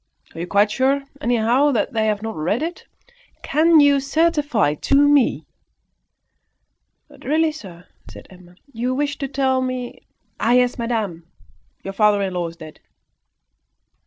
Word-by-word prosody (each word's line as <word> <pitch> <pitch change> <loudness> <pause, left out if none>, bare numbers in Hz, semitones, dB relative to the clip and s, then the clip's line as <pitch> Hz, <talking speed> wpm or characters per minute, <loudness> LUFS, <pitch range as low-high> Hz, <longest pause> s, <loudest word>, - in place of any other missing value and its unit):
Are 165 - -10
you 175 - -5
quite 205 +2 +2
sure, 270 +3 +1 0.2
anyhow, 240 +4 +2
that 225 - -1
they 220 -1 0
have 210 0 -1
not 225 0 -5
read 180 - -1
it? 340 +2 -6 0.6
Can 320 +2 +4
you 285 -1 +5
certify 290 - +1
to 215 - -1
me 290 -2 +3 0.7
" - - -53
"But - - -18
really, 315 +2 +1
sir," 180 - -12 0.2
said - - -13
Emma, 180 -1 -17 0.2
"you 245 +3 -2
wished 285 +1 -2
to 275 - -3
tell 265 -1 0
me 255 -1 -5 0.2
" - - -45
"Ah, 235 - +2
yes! 250 0 +2
madame. 210 -8 -3 0.6
Your 195 - -6
father 210 0 +3
in 190 -1 -3
law 175 -1 -2
is 165 - -10
dead." 155 -1 -12
245 Hz, 160 wpm, -20 LUFS, 200-280 Hz, 0.7 s, you